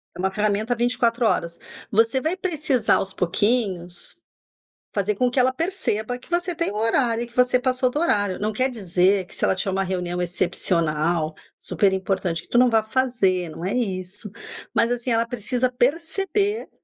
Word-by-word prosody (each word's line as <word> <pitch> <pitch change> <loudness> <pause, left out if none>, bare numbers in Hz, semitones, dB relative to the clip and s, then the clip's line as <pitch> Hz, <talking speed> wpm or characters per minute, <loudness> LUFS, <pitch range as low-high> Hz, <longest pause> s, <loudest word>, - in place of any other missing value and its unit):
É - - -11
uma 190 +1 0
ferramenta 210 +3 0
24 240 0 +1
horas. 170 -4 -1 0.3
Você 230 +5 +3
vai 335 +5 -1
precisar, 305 - +1
aos 195 0 -2
pouquinhos, 185 - 0 0.8
fazer 205 0 0
com 250 +4 +2
que 245 - -7
ela 255 +1 +4
perceba 255 - -2
que 250 - -19
você 345 0 0
tem 335 - -1
o - - -7
horário, 230 +1 +1
e 240 - -7
que 235 - -21
você 250 0 +4
passou 255 0 +1
do 290 +5 -2
horário. 205 - +1
Não 215 +1 -1
quer 255 +4 +1
dizer 190 -3 +1
que - - -10
se - - -4
ela - - +3
tinha 190 +1 -2
uma 195 0 +1
reunião 180 -1 -2
excepcional, 170 -2 0 0.2
super 200 -2 +1
importante, 185 -3 -1
que - - -19
tu - - +1
não 250 0 +6
vá 225 -1 +3
fazer, 215 -7 0
não 165 +3 -7
é 195 - -1
isso, 195 -2 -3 0.4
mas, 230 - +3
assim, 245 0 -1
ela 230 0 +2
precisa 245 +2 -1
perceber 385 - 0
220 Hz, 180 wpm, -23 LUFS, 190-250 Hz, 0.8 s, não